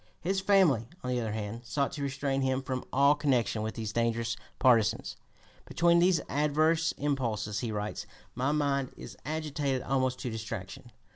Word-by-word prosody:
His 190 +3 -1
family, 180 - +4 0.2
on 125 - -2
the 125 - +1
other 110 -2 -3
hand, 110 +1 -4
sought 130 +5 -1
to 145 - -6
restrain 135 0 -1
him 130 0 0
from 130 -1 -3
all 140 +2 +5
connection 130 -7 +1
with 110 +1 -3
these 110 -2 -4
dangerous 115 0 0 0.2
partisans. 115 -6 +3 0.5
"Between 170 0 +3
these 175 -1 +4
adverse 155 +3 +2
impulses," 115 -8 -1
he 115 0 -3
writes, 105 0 -4 0.3
"my 130 +4 0
mind 140 -3 0
is - - -9
agitated 145 -3 -2
almost 130 -1 0
to 125 - -3
distraction.... 110 0 -6
130 Hz, 160 wpm, -30 LUFS, 115-145 Hz, 0.5 s, all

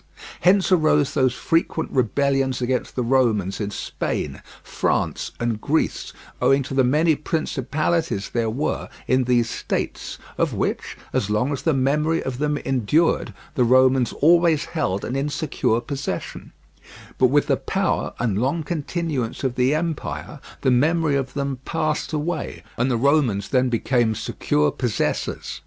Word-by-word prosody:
Hence 190 +2 +3
arose 155 -5 +3
those 130 -3 +2
frequent 165 0 0
rebellions 135 +1 +1
against 125 0 -2
the 125 - 0
Romans 115 -6 +1
in 100 - -2
Spain, 105 - -4 0.2
France, - - -1
and 115 -2 -1
Greece, 160 +3 0 0.3
owing 135 0 +4
to 135 - -7
the 135 -1 +3
many 155 +6 +3
principalities 155 -5 -1
there 115 -2 0
were 135 +8 -2 0.2
in 130 0 +2
these 120 -1 +2
states, - - -3 0.2
of - - +1
which, - - -2 0.2
as 100 - 0
long 110 +7 +1
as 140 - -4
the 160 -4 +1
memory 150 +5 +1
of 130 -1 -4
them 150 0 0
endured, 135 +5 +1 0.2
the 130 -5 +2
Romans 130 +1 +4
always 165 -1 +4
held 100 - -2
an 125 - -3
insecure 140 -4 0
possession; 140 +3 -5 0.7
but 130 - +6
with 145 +3 +3
the - - +2
power - - -1
and 110 -3 0
long 145 +6 0
continuance 155 -6 -3
of 130 -2 0
the 130 +4 +2
empire 155 -2 -4 0.2
the 130 - +3
memory 155 +4 +2
of 135 -1 -2
them 140 -2 -2
passed 155 -1 -1
away, 155 +1 -3
and 125 +3 +1
the 120 - +1
Romans 125 -6 +2
then 130 -1 +2
became 120 -1 +1
secure 75 -6 0
possessors. - - -2
135 Hz, 145 wpm, -23 LUFS, 125-155 Hz, 0.7 s, but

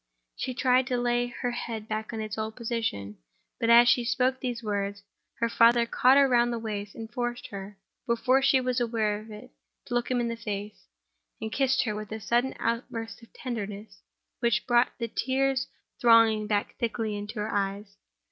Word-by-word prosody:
She 255 - -4
tried 255 0 +3
to 250 -2 0
lay 240 0 +1
her 245 0 -3
head 225 -2 -5
back 215 0 -3
in 225 -2 -4
its 215 -1 -4
old 220 0 -4
position; 225 - -3 0.4
but 230 - +1
as 235 +1 +8
she 245 0 +4
spoke 255 +2 +1
those 245 -3 -3
words, 200 -1 -2 0.3
her 230 - 0
father 235 +1 +5
caught 255 +3 +4
her 280 -1 +6
round 240 -1 +3
the 235 - -2
waist, 210 -3 -5 0.2
forced 240 0 -3
her, 200 -2 -8 0.3
before 250 +3 +3
she 270 -1 +4
was 255 0 0
aware 220 -3 0
of 215 +1 -13
it, 220 +4 -11 0.3
to 245 - -6
look 240 0 0
him 250 -1 +1
in 240 - 0
the 230 - -3
face—and 195 - -8
kissed 265 0 +2
her, 220 -4 -2
with 210 0 -7
a 220 - -4
sudden 240 +4 0
outburst 230 0 -3
of 230 - -17
tenderness 215 -4 -6 0.4
which 235 -1 +1
brought 240 0 +4
the 235 - -2
tears 270 +3 0 0.3
thronging 230 -2 +5
back 205 -1 0
thickly 225 -2 -2
into 205 +2 -6
her 210 +1 -3
eyes. 200 0 -2
230 Hz, 185 wpm, -27 LUFS, 210-245 Hz, 0.4 s, as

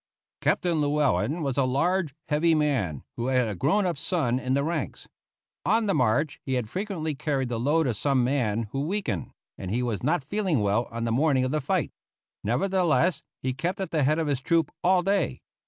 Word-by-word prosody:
Captain 170 -4 +1
Llewellen 145 - +1
was 135 -2 -2
a 140 - +4
large, 155 +4 +1
heavy 160 +2 +3
man, 125 - 0
who 120 - -2
had 130 -2 +2
a 105 - -2
grown 155 - +1
up 175 -6 -1
son 135 -10 0
in 130 +1 0
the 140 - +1
ranks. 160 -2 -3 0.6
On 220 +3 +2
the 200 - +1
march 125 +5 +1
he 130 - -1
had 125 -3 -1
frequently 185 -6 -3
carried 135 -2 -1
the 120 -2 -2
load 150 +6 +2
of 125 -4 0
some 135 +2 +1
man 120 -4 +1
who 135 - -2
weakened, 155 - -2 0.3
and 95 - -5
he 120 +5 0
was 115 -4 -2
not 155 +3 +1
feeling 185 - 0
well 105 +4 +1
on 115 0 -4
the 115 - 0
morning 135 +1 +2
of 130 - -1
the 155 0 0
fight. 175 +2 0 0.5
Nevertheless, 175 - +2 0.2
he 130 0 0
kept 175 +8 -2
at 190 - -3
the 155 - +1
head 150 +3 +3
of 165 - 0
his 140 -3 -1
troop 165 +1 +1
all 180 0 +4
day. 195 -2 0
145 Hz, 205 wpm, -26 LUFS, 125-170 Hz, 0.6 s, a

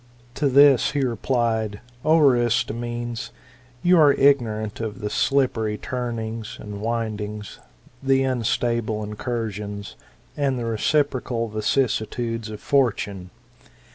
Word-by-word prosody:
"To 145 +1 +1
this 140 -1 +5
he 140 -2 +1
replied, 115 -3 -1 0.2
O 160 +1 +4
Aristomenes, 120 -3 +1 0.5
you 175 -1 +5
are 145 -2 +7
ignorant 115 -7 +2
of 110 0 -4
the 105 -2 -4
slippery 115 -6 +1
turnings 115 -3 -4
and 105 -1 -7
windings, 105 -2 -4 0.4
the 135 0 +3
unstable 115 -3 0
incursions, 105 -2 -4 0.4
and 140 -3 0
fhe 115 -1 -2
reciprocal 125 -1 0
vicissitudes 115 0 -1
of 105 -1 -7
Fortune. 100 -10 0
115 Hz, 105 wpm, -23 LUFS, 110-130 Hz, 0.5 s, are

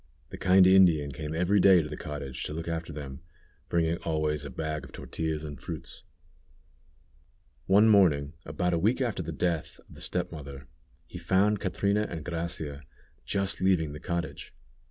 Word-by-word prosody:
The - - -7
kind 95 0 +6
Indian 90 -6 +5
came 75 +3 -5
every 90 +5 +2
day 95 -3 +6
to - - -5
the 75 - -6
cottage 70 -4 -6
to - - -4
look 80 +1 -5
after 85 0 -3
them, 70 -3 -7 0.5
bringing 85 0 +1
always 75 -3 -1
a 70 - -6
bag 75 +3 -4
of - - -11
tortillas 80 -1 -4
and 75 -4 -8
fruits. - - -7 1.7
One 100 +3 +6
morning, 80 -9 +4
about 90 +4 -1
a 85 - +1
week 110 +9 +2
after 120 -8 -1
the 80 -1 -5
death 85 +1 -2
of - - -15
the - - -12
step 90 -1 -2
mother, 70 -3 -9 0.4
he - - -9
found 100 +2 +2
Catrina 100 +2 0
and 80 -3 -6
Gracia 80 -4 -4 0.4
just 100 -1 -1
leaving 90 -5 +2
the 75 - -7
cottage. 85 +2 -4
80 Hz, 170 wpm, -28 LUFS, 75-95 Hz, 1.7 s, kind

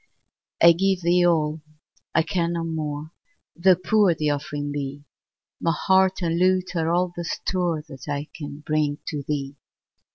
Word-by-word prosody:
I 170 - +10
give 190 +2 +1
thee 175 +1 +4
all 155 -2 +1 0.5
I - - +4
can 170 0 -1
no 170 -1 -2
more 155 -2 -4 0.4
Tho' 185 +2 +5
poor 185 0 +3
the 150 -1 0
offering 145 0 -3
be; 140 0 -5 0.6
My 165 0 +1
heart 190 -1 +3
and 165 0 0
lute 185 0 +2
are 165 -1 0
all 175 0 +1
the 175 - -4
store 170 -2 -1
That 135 -3 -11
I 145 +1 -3
can 145 -1 -8
bring 150 -1 0
to 150 -2 -3
thee. 140 -1 -4
165 Hz, 160 wpm, -24 LUFS, 145-180 Hz, 0.6 s, I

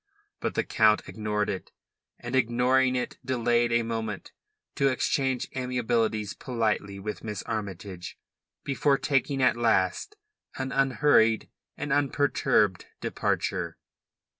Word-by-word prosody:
But - - -3
the - - +1
Count 110 -1 +3
ignored 105 -1 -2
it, 95 - -4 0.5
and 120 +1 -5
ignoring 130 +1 +3
it 125 - -3
delayed 120 -2 +1
a 115 0 +3
moment 110 -3 -4 0.4
to 140 - +2
exchange 130 0 0
amiabilities 115 -4 0
politely 110 -5 -2
with 105 +2 -5
Miss 105 -3 -4
Armytage, 95 -4 -5 0.5
before 140 0 +2
taking 135 -1 0
at - - +4
last 115 - +1 0.4
an 130 0 -3
unhurried 135 -4 +3 0.3
and 150 - -2
unperturbed 140 -8 +2
departure. - - -2
120 Hz, 115 wpm, -27 LUFS, 105-130 Hz, 0.5 s, at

